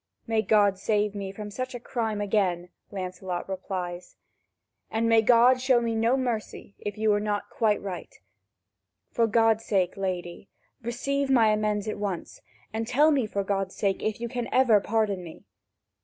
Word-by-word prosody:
"May 225 Hz, -2 st, +1 dB
God 205 Hz, -3 st, +3 dB
save 210 Hz, 0 st, +1 dB
me 200 Hz, -2 st, -5 dB
from 210 Hz, +1 st, -8 dB
such 255 Hz, +4 st, -4 dB
a -, -, -5 dB
crime 225 Hz, -3 st, -2 dB
again," 190 Hz, -4 st, 0 dB, 0.2 s
Lancelot 185 Hz, -2 st, -5 dB
replies, 185 Hz, -2 st, -5 dB, 0.7 s
"and 225 Hz, +1 st, 0 dB
may 225 Hz, -1 st, +5 dB
God 245 Hz, +3 st, +5 dB
show 255 Hz, -2 st, +4 dB
me 230 Hz, -1 st, -1 dB
no 230 Hz, +4 st, +2 dB
mercy, 235 Hz, -5 st, -4 dB
if 205 Hz, 0 st, -5 dB
you 215 Hz, 0 st, +2 dB
were 205 Hz, -, +3 dB
not 205 Hz, -1 st, -2 dB
quite 215 Hz, -3 st, +1 dB
right! 190 Hz, -3 st, -6 dB, 1.0 s
For 230 Hz, -1 st, +2 dB
God's 225 Hz, 0 st, +3 dB
sake, 190 Hz, -5 st, 0 dB
lady, 185 Hz, -1 st, -4 dB, 0.3 s
receive 275 Hz, +4 st, -2 dB
my 235 Hz, -5 st, +5 dB
amends 210 Hz, -1 st, 0 dB
at 215 Hz, -, -3 dB
once, 195 Hz, -4 st, -4 dB, 0.3 s
and 225 Hz, 0 st, -2 dB
tell 290 Hz, +6 st, +4 dB
me, 265 Hz, -7 st, +1 dB
for 200 Hz, -1 st, -2 dB
God's 195 Hz, -1 st, -2 dB
sake, 195 Hz, -2 st, 0 dB
if 215 Hz, 0 st, -2 dB
you 235 Hz, -, -3 dB
can 245 Hz, 0 st, -4 dB
ever 245 Hz, -5 st, +5 dB
pardon 205 Hz, -4 st, 0 dB
me." 165 Hz, -2 st, -11 dB
215 Hz, 170 wpm, -27 LUFS, 195-230 Hz, 1.0 s, may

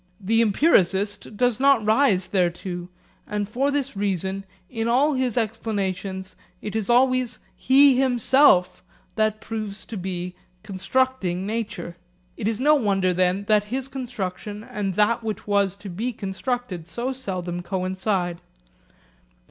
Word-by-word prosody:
The 225 Hz, +4 st, +2 dB
empiricist 205 Hz, -, +2 dB
does 245 Hz, -1 st, +2 dB
not 275 Hz, -5 st, +4 dB
rise 215 Hz, -5 st, +3 dB
thereto, 175 Hz, -1 st, -1 dB, 0.4 s
and 210 Hz, -1 st, -2 dB
for 255 Hz, +7 st, 0 dB
this 280 Hz, -3 st, -2 dB
reason 195 Hz, -1 st, -2 dB, 0.2 s
in 225 Hz, 0 st, -3 dB
all 275 Hz, +6 st, +3 dB
his 255 Hz, -3 st, 0 dB
explanations 200 Hz, -4 st, -2 dB, 0.2 s
it 210 Hz, -, -6 dB
is 220 Hz, -1 st, -2 dB
always 255 Hz, 0 st, +3 dB, 0.2 s
he 270 Hz, 0 st, +5 dB
himself 245 Hz, -7 st, +4 dB, 0.3 s
that 215 Hz, -1 st, +1 dB
proves 215 Hz, -3 st, -6 dB
to 220 Hz, -, -7 dB
be 180 Hz, -1 st, -4 dB, 0.3 s
constructing 195 Hz, -2 st, -1 dB
nature. 205 Hz, -6 st, -4 dB, 0.4 s
It 210 Hz, -, -3 dB
is 225 Hz, 0 st, -1 dB
no 295 Hz, +4 st, +5 dB
wonder, 195 Hz, -9 st, +2 dB
then, 185 Hz, +2 st, +1 dB
that 210 Hz, 0 st, +3 dB
his 255 Hz, +5 st, -3 dB
construction 215 Hz, -6 st, -5 dB
and 200 Hz, -4 st, -3 dB
that 215 Hz, +3 st, +2 dB
which 215 Hz, -1 st, -4 dB
was 200 Hz, -2 st, +1 dB
to 200 Hz, 0 st, -11 dB
be 220 Hz, +7 st, -3 dB
constructed 195 Hz, -3 st, -4 dB
so 240 Hz, +9 st, -3 dB
seldom 180 Hz, -8 st, -4 dB
coincide. 185 Hz, 0 st, -2 dB
210 Hz, 130 wpm, -24 LUFS, 190-245 Hz, 0.4 s, he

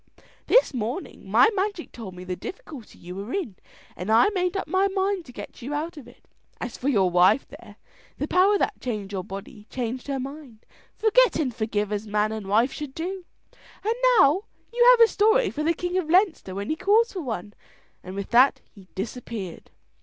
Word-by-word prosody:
This -, -, +4 dB
morning 245 Hz, -, -5 dB
my -, -, +5 dB
magic 390 Hz, -3 st, -2 dB
told 200 Hz, -6 st, -9 dB
me 180 Hz, -, -9 dB
the 185 Hz, 0 st, -4 dB
difficulty 270 Hz, -, -9 dB
you 180 Hz, +1 st, -9 dB
were 200 Hz, +5 st, -6 dB
in, 255 Hz, -, -3 dB, 0.4 s
and 180 Hz, -, -6 dB
I 230 Hz, -, +6 dB
made 365 Hz, -2 st, -1 dB
up -, -, -3 dB
my 380 Hz, +1 st, +2 dB
mind 385 Hz, -2 st, -1 dB
to 250 Hz, -, -12 dB
get -, -, -10 dB
you 280 Hz, +5 st, -4 dB
out 325 Hz, +4 st, -3 dB
of 285 Hz, -6 st, -11 dB
it. 245 Hz, -, -19 dB, 0.3 s
As 230 Hz, 0 st, -5 dB
for 270 Hz, -, -2 dB
your 195 Hz, -8 st, +2 dB
wife 180 Hz, +9 st, +4 dB
there, -, -, -13 dB, 0.4 s
the 290 Hz, -, -2 dB
power 380 Hz, +5 st, +4 dB
that 420 Hz, -, -2 dB
changed 210 Hz, -5 st, -4 dB
your 190 Hz, -2 st, -3 dB
body 205 Hz, +4 st, -9 dB
changed 250 Hz, +1 st, -4 dB
her 275 Hz, -1 st, -2 dB
mind. 270 Hz, -4 st, -9 dB, 0.3 s
Forget 450 Hz, +3 st, +4 dB
and 275 Hz, -6 st, -1 dB
forgive 215 Hz, -3 st, -2 dB
as 210 Hz, +1 st, -3 dB
man 210 Hz, +1 st, 0 dB
and 215 Hz, -3 st, -5 dB
wife 225 Hz, +6 st, +2 dB
should 295 Hz, -3 st, -7 dB
do, 365 Hz, +2 st, -5 dB, 0.6 s
and 440 Hz, +2 st, +1 dB, 0.2 s
now 345 Hz, +5 st, +4 dB, 0.3 s
you 480 Hz, 0 st, +3 dB
have -, -, +7 dB
a 460 Hz, -, +9 dB
story 440 Hz, +2 st, +3 dB
for 300 Hz, -, -4 dB
the 320 Hz, +2 st, +2 dB
King 360 Hz, +2 st, -1 dB
of 320 Hz, -4 st, -4 dB
Leinster 350 Hz, -, +2 dB
when 200 Hz, +5 st, -3 dB
he -, -, 0 dB
calls 430 Hz, +8 st, +2 dB
for 375 Hz, -, -4 dB
one;" 215 Hz, -, -5 dB, 0.5 s
and 185 Hz, +1 st, -8 dB
with 200 Hz, 0 st, -5 dB
that 250 Hz, +3 st, +5 dB
he 195 Hz, -4 st, -16 dB
disappeared. 210 Hz, -3 st, -6 dB
265 Hz, 200 wpm, -25 LUFS, -, 0.6 s, a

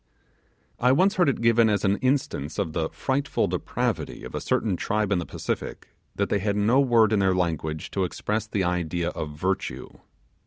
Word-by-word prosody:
I 125 Hz, +1 st, +4 dB
once 195 Hz, +8 st, +3 dB
heard 175 Hz, -5 st, +4 dB
it 135 Hz, -, -2 dB
given 115 Hz, -1 st, +4 dB
as 105 Hz, -1 st, +1 dB
an 100 Hz, +1 st, +2 dB
instance 130 Hz, -, -1 dB
of 95 Hz, -6 st, -2 dB
the 80 Hz, -1 st, -1 dB
frightful 140 Hz, +2 st, -1 dB
depravity -, -, -2 dB
of -, -, -8 dB
a -, -, -3 dB
certain 105 Hz, -5 st, 0 dB
tribe 105 Hz, +3 st, -1 dB
in 95 Hz, -, +2 dB
the 85 Hz, -, -5 dB
Pacific -, -, -5 dB, 0.3 s
that -, -, -1 dB
they 100 Hz, -, +1 dB
had 100 Hz, +1 st, -1 dB
no 110 Hz, +6 st, +3 dB
word 115 Hz, -5 st, +4 dB
in 105 Hz, -, +3 dB
their 95 Hz, -1 st, +3 dB
language 80 Hz, -3 st, -2 dB
to 95 Hz, -, 0 dB
express 105 Hz, +4 st, -2 dB
the 100 Hz, -3 st, -1 dB
idea 85 Hz, -1 st, -1 dB
of 75 Hz, -1 st, -6 dB
virtue. 95 Hz, +4 st, -2 dB
100 Hz, 190 wpm, -25 LUFS, 90-115 Hz, 0.3 s, I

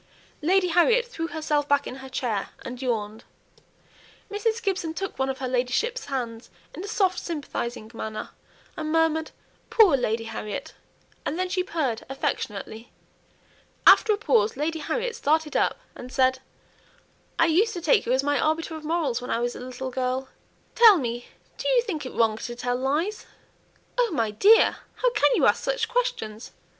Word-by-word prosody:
Lady 365 Hz, +3 st, +3 dB
Harriet 455 Hz, +9 st, +4 dB
threw 330 Hz, -9 st, -4 dB
herself 305 Hz, -3 st, -1 dB
back 285 Hz, 0 st, +2 dB
in 255 Hz, -, -6 dB
her 265 Hz, 0 st, -10 dB
chair, 235 Hz, -6 st, -2 dB, 0.2 s
and 250 Hz, 0 st, -6 dB
yawned; 220 Hz, -3 st, -2 dB, 1.1 s
Mrs. 440 Hz, +2 st, 0 dB
Gibson 380 Hz, -7 st, -2 dB
took 390 Hz, -4 st, -5 dB
one 265 Hz, 0 st, +1 dB
of 265 Hz, -, -2 dB
her 260 Hz, -, -3 dB
ladyship's 255 Hz, -, -1 dB
hands 240 Hz, -4 st, -4 dB, 0.2 s
in 350 Hz, -, -7 dB
a -, -, -6 dB
soft 380 Hz, -4 st, +1 dB
sympathizing 245 Hz, -8 st, -5 dB
manner, 220 Hz, -1 st, -5 dB, 0.5 s
and 310 Hz, -1 st, -3 dB
murmured, 320 Hz, -1 st, +2 dB, 0.4 s
"Poor 405 Hz, -10 st, +6 dB
Lady 230 Hz, -3 st, -1 dB
Harriet!" 220 Hz, -2 st, -6 dB, 0.5 s
and 305 Hz, -, -3 dB
then 370 Hz, 0 st, 0 dB
she 370 Hz, 0 st, 0 dB
purred 290 Hz, -11 st, -2 dB
affectionately. 225 Hz, -4 st, -4 dB, 0.9 s
After 440 Hz, -, +7 dB
a 415 Hz, -, +2 dB
pause 240 Hz, -, +2 dB
Lady 320 Hz, +3 st, -1 dB
Harriet 475 Hz, +9 st, -2 dB
started 310 Hz, +1 st, 0 dB
up -, -, +2 dB, 0.2 s
and 250 Hz, +1 st, -9 dB
said 260 Hz, 0 st, +2 dB, 1.0 s
"I 330 Hz, -, +5 dB
used 380 Hz, +8 st, +3 dB
to 350 Hz, -, -5 dB
take 425 Hz, +5 st, +3 dB
you -, -, +1 dB
as 260 Hz, +2 st, +2 dB
my 290 Hz, 0 st, +1 dB
arbiter 320 Hz, +1 st, 0 dB
of 315 Hz, -, -8 dB
morals 305 Hz, -6 st, -1 dB
when 250 Hz, -, -7 dB
I -, -, +1 dB
was 240 Hz, +1 st, -2 dB
a -, -, -7 dB
little 255 Hz, +1 st, -6 dB
girl. 255 Hz, +1 st, -2 dB, 0.4 s
Tell 450 Hz, -4 st, +8 dB
me, 240 Hz, -4 st, -3 dB, 0.3 s
do -, -, -1 dB
you -, -, +4 dB
think 315 Hz, -, -4 dB
it -, -, -9 dB
wrong 225 Hz, -2 st, +2 dB
to 240 Hz, +1 st, -5 dB
tell 245 Hz, 0 st, -1 dB
lies?" 300 Hz, +11 st, -1 dB, 0.7 s
"Oh, 485 Hz, -2 st, +3 dB
my 230 Hz, -8 st, 0 dB
dear! 410 Hz, -, +5 dB, 0.2 s
how -, -, +1 dB
can -, -, +3 dB
you -, -, +3 dB
ask -, -, +3 dB
such -, -, 0 dB
questions? 475 Hz, -, -2 dB
295 Hz, 170 wpm, -25 LUFS, 245-370 Hz, 1.1 s, Tell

